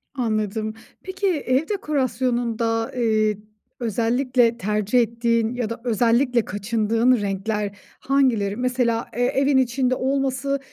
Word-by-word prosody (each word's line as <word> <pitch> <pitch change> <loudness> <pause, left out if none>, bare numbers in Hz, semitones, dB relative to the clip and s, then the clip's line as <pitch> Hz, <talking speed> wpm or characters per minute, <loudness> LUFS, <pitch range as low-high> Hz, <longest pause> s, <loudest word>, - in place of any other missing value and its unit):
Anladım. 215 -3 -1 0.3
Peki, 380 +1 -2
ev 290 -4 0
dekorasyonunda, 245 - -1
eee, 215 -3 +1 0.4
özellikle 235 +1 +1
tercih 210 +3 +1
ettiğin 230 0 +1
ya 240 -3 -2
da 230 +1 -6
özellikle 240 +1 +2
kaçındığın 225 +4 +1
renkler 200 +1 -2 0.2
hangileri? 245 -8 +1
Mesela, 245 -1 0
eee, 245 - +1
evin 275 +2 +2
içinde 255 0 +1
olması 270 +1 -1
235 Hz, 105 wpm, -22 LUFS, 220-260 Hz, 0.4 s, özellikle